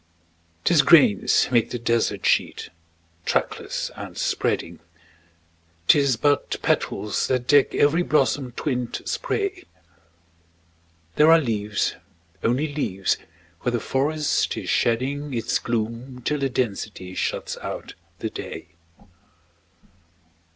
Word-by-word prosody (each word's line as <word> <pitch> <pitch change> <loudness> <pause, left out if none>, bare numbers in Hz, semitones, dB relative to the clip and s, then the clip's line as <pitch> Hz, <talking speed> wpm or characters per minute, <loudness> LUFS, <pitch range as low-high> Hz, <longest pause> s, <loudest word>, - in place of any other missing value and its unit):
'Tis 170 -4 +5
grains 140 - +5
make 120 -3 +3
the 125 - -3
desert 115 -4 0
sheet, - - +1 0.5
trackless - - -2
and - - -8
spreading; 85 +1 -1 1.1
'Tis 140 -4 +5
but 145 +3 +1
petals 105 - 0
that 125 -2 0
deck 145 +1 +4
every 150 +4 +3
blossom 140 -5 +1
twinned 125 -3 -2
spray; 400 -6 -2 1.5
There 155 +2 +7
are 165 - +8
leaves 105 -6 -1 0.5
only 140 +6 0
leaves 95 -10 0 0.4
where 125 - -2
the 120 - +1
forest 145 +5 0
is - - -3
shedding 135 +4 0
Its 115 -2 0
gloom 120 +2 -4
till 150 -1 0
the 135 -1 0
density 105 -6 -3
shuts - - -2
out - - -6 0.2
the - - -4
day. - - -7
125 Hz, 110 wpm, -24 LUFS, 115-145 Hz, 1.5 s, are